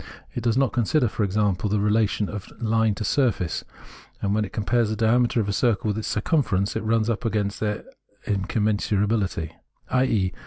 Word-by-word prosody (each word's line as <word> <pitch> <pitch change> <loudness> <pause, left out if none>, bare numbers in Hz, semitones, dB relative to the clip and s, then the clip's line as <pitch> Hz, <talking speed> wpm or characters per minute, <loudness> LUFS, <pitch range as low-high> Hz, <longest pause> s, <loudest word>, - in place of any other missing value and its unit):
It 120 - -3
does 115 0 +1
not 135 -2 +2
consider, 120 +3 +2
for 110 - -2
example, 100 0 0
the 105 +1 +1
relation 105 0 +1
of 105 -3 -7
line 110 -2 +2
to 110 - -4
surface, 105 - 0 0.6
and 100 0 0
when 105 0 +2
it 100 - -6
compares 115 +1 +1
the 110 - -1
diameter 115 +2 +2
of 105 - 0
a 100 - -1
circle 110 -2 +1
with 105 - -1
its 110 - -4
circumference, 105 - 0
it - - -1
runs 110 0 +1
up 115 -1 -1
against 105 -3 -1
their 105 -1 -2 0.4
incommensurability, 105 -3 0 0.4
i.e. 115 -8 +2
110 Hz, 180 wpm, -24 LUFS, 100-115 Hz, 0.6 s, not